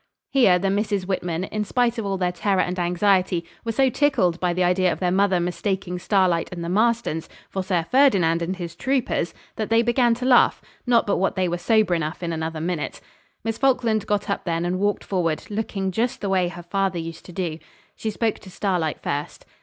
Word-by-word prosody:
Here 235 -10 +5
the 195 +2 0
Misses 205 -1 0
Whitman, 180 -2 -2
in 210 +2 -2
spite 240 +2 0
of 210 - -3
all 195 -1 -1
their 180 -1 0
terror 190 +1 +1
and 180 +1 -2
anxiety, 180 0 +2 0.2
were 230 - -2
so 265 +3 +2
tickled 190 - +2
by 180 -1 +1
the 180 +1 +1
idea 180 0 +3
of - - -4
their 180 -1 +1
mother 190 -1 +3
mistaking 180 +1 -2
Starlight 185 -3 +2
and 175 -2 -5
the 170 - -3
Marstons 220 -5 +1 0.2
for 190 - -2
Sir 180 -3 0
Ferdinand 195 -12 +4
and 175 +3 -2
his 170 -2 -6
troopers 250 -5 0 0.3
that 215 - -2
they 225 +1 +4
began 240 0 +3
to 250 +2 -5
laugh, 255 -1 +5 0.3
not 240 -1 +4
but 205 - +1
what 190 - 0
they 185 -1 +1
were 175 0 -2
sober 215 0 +3
enough 165 +1 -2
in 170 -1 -2
another 160 0 -3
minute. 165 -1 -3 0.4
Miss 225 0 -3
Falkland 245 -6 +2
got 205 -1 0
up 200 - -2
then 170 -2 -1
and 180 +1 -1
walked 205 +1 0
forward, 165 -5 -1
looking 205 -3 -2
just 235 +5 -1
the 200 - -3
way 185 -2 +2
her 175 0 -8
father 190 +1 -1
used 165 0 -6
to - - -10
do. 170 -3 -3 0.4
She 220 - -3
spoke 220 +1 -1
to 190 - -13
Starlight 180 -5 -1
first. 145 +1 -4
190 Hz, 210 wpm, -23 LUFS, 175-215 Hz, 0.4 s, Here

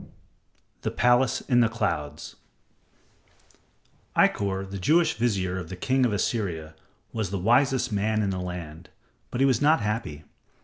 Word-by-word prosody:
] - - -42
The - - -1
Palace 125 +1 +2
in 120 -3 +2
the 115 -2 +4
Clouds 75 -10 -3 1.8
Ikkor, 95 -1 +2
the 100 0 -6
Jewish 160 - +3
vizier 95 -6 -1
of 85 -3 -8
the 95 - -6
king 130 +7 +1
of - - -2
Assyria, 90 -6 -2 0.4
was 110 -4 -2
the 100 - -2
wisest 125 +5 +2
man 105 +1 0
in 100 - 0
the 95 - -3
land, 85 -2 -7 0.4
but 120 - -3
he - - +6
was 130 -3 +2
not 155 +2 +4
happy. 105 -9 -3
105 Hz, 150 wpm, -26 LUFS, 90-120 Hz, 1.8 s, he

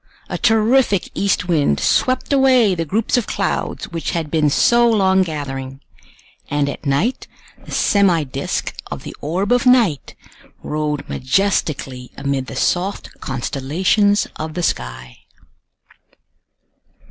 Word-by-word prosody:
A - - -3
terrific 225 -2 +2
east 195 -2 0
wind 145 - +2
swept 255 - +1
away 255 -7 +4
the 165 -2 -2
groups 220 - 0
of 240 - -1
clouds - - -2
which 165 -1 -3
had 155 -3 -4
been 155 -2 +2
so 235 +10 +4
long 190 -4 +3
gathering, 135 -5 -4 0.7
and 145 0 0
at 145 - -5
night 160 - 0 0.4
the - - -13
semi 190 -6 +2
disc 135 0 -3 0.2
of - - -6
the - - -8
orb 180 +8 -2
of 245 +1 +3
night 230 - +3 0.5
rode 150 -1 -3
majestically 135 -4 -1
amid 140 -1 -2
the - - -7
soft 185 +3 -1
constellations 160 - 0
of 155 0 -5
the 175 - -2
sky. - - -3
165 Hz, 125 wpm, -19 LUFS, 140-205 Hz, 0.7 s, away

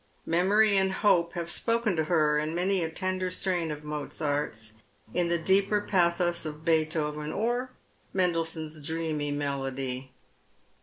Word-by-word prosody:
Memory 200 +5 +4
and 190 0 +2
hope 170 -4 +3
have 170 -2 -3
spoken 230 +2 +1
to 160 -1 0
her 155 -3 +3
in 155 +2 -2
many 185 +1 +1
a 160 - -1
tender 185 +2 -2
strain 180 -2 -1
of 150 0 -5
Mozart's, 145 -6 -3 0.4
in 175 -1 +1
the 170 - +2
deeper 195 +4 +3
pathos 175 -3 +1
of 155 0 -7
Beethoven, 155 -2 0
or 240 +6 -1 0.4
Mendelssohn's 165 -4 -1
dreamy 160 -1 -2
melody. 135 -2 -3
165 Hz, 135 wpm, -28 LUFS, 150-185 Hz, 0.4 s, Memory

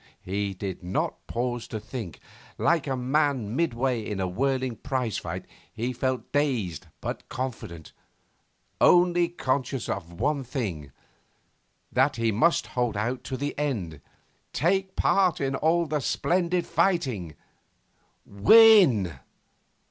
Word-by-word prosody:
He 100 +1 -2
did 95 0 -5
not 90 +1 -3
pause 120 0 -3
to 110 - -5
think. 110 - -7 0.4
Like 165 -4 +2
a 135 - 0
man 130 -4 0
midway 125 -6 0
in 105 -2 -4
a 95 - 0
whirling 130 +4 -1
prize 125 -4 -2
fight, - - -6 0.3
he 120 +3 -3
felt 130 +1 -2
dazed 125 - -1
but - - -5
confident, 115 -11 -6 0.9
only 175 -1 +5
conscious 130 -5 -2
of 85 - -4
one 145 -2 0
thing 100 - -4 1.0
that 130 +3 +2
he 115 -1 +1
must 160 +11 +2
hold 120 -4 0
out 120 +4 -2
to 130 - -4
the 145 +2 -3
end, 95 - -3 0.5
take 190 +3 0
part 185 -4 +2
in 135 -1 -1
all 165 +4 +2
the 150 -1 -1
splendid 175 +5 0
fighting 160 - 0 0.9
win. 120 - +6
130 Hz, 125 wpm, -26 LUFS, 105-150 Hz, 1.0 s, win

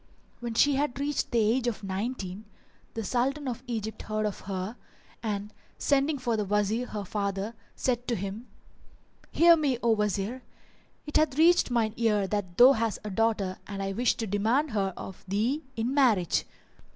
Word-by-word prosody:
When 235 -1 -5
she 285 +3 +4
had 280 -2 -1
reached 285 0 -1
the 235 - 0
age 230 +3 +2
of 220 -3 -2
nineteen, 195 -1 -3
[FN#400] 215 -1 -24
the 225 - -2
Sultan 265 +6 0
of 245 -1 -3
Egypt 220 -2 -4
heard 215 0 -2
of 210 - -3
her 190 +4 -3 0.5
and, 210 -2 -3 0.2
sending 285 +1 +2
for 245 -3 -1
the 210 - 0
Wazir 210 +4 0
her 205 -2 -5
father, 200 +2 -2 0.2
said 245 -1 -1
to 240 - +1
him, 200 +4 -5 0.8
'Hear 340 0 +6
me, 290 -6 +1
O 235 - +4
Wazir: 210 +3 0 0.6
it 295 - +1
hath 300 -3 +2
reached 335 0 +5
mine 230 -3 +1
ear 210 -4 +2
that 190 -3 -3
thou 250 +2 +9
hast 225 -5 0
a 210 - -5
daughter 200 -3 0
and 195 -1 -4
I 195 - -2
wish 240 +4 +2
to 225 - -3
demand 225 +9 +1
her 195 -3 0
of 190 - -8
thee 225 +10 0
in 230 +3 -1
marriage." 230 - +3
225 Hz, 175 wpm, -28 LUFS, 205-255 Hz, 0.8 s, thou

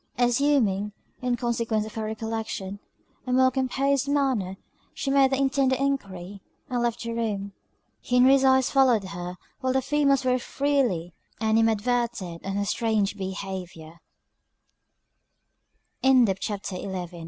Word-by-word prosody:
Assuming, 240 -5 +2 0.3
in 250 -1 0
consequence 230 -2 -1
of 215 - -9
her 220 -1 -3
recollection, 220 -2 -4 0.5
a - - -1
more 260 +1 +4
composed 270 +1 0
manner, 260 -10 0 0.4
she 275 - -2
made 275 -1 +5
the 265 - +1
intended 270 -1 +2
enquiry, 200 -9 -3 0.3
and 245 -1 0
left 240 0 -1
the 230 0 -4
room. 205 -4 -3 0.6
Henry's 260 +2 +5
eyes 265 -1 +4
followed 255 -6 +4
her 180 -1 -6 0.2
while 260 -1 0
the 265 - +2
females 280 -1 +2
very 255 0 +2
freely 245 - 0 0.3
animadverted 225 -4 0
on 195 0 -3
her 200 0 0
strange 210 -2 0
behaviour. 185 -4 -6
235 Hz, 115 wpm, -26 LUFS, 200-265 Hz, 0.6 s, made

